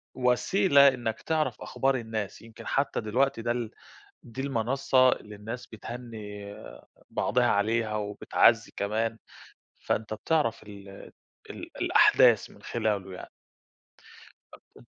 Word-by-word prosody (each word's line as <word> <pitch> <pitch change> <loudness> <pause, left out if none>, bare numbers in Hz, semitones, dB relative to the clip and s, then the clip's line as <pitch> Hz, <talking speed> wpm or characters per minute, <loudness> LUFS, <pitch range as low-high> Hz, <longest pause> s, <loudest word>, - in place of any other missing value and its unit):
وسيلة 140 +4 +4
إنّك 120 -4 -1
تعرف 160 -1 -1
أخبار 135 0 0
الناس، 110 -4 -4
يمكن 115 -1 -12
حتى 140 -2 0
دلوقتي 115 +3 0
ده 120 - -1
ال 120 -2 -3 0.5
دي 120 +2 -9
المنصة 130 0 +2
اللي 105 - -5
الناس 110 +4 -7
بتهنّي 105 -3 -8 0.6
بعضها 120 +2 +1
عليها 110 +1 +1
وبتعزّي 105 +2 +2
كمان، 110 +2 -1 0.6
فأنت 110 0 -2
بتعرف 115 0 0
ال 100 -1 -12 0.6
ال - - -8
الأحداث - - +5
من - - -18
خلاله 105 -5 -2
يعني. 90 - -9 1.2
أبت - - -18
115 Hz, 110 wpm, -28 LUFS, 105-125 Hz, 1.2 s, الأحداث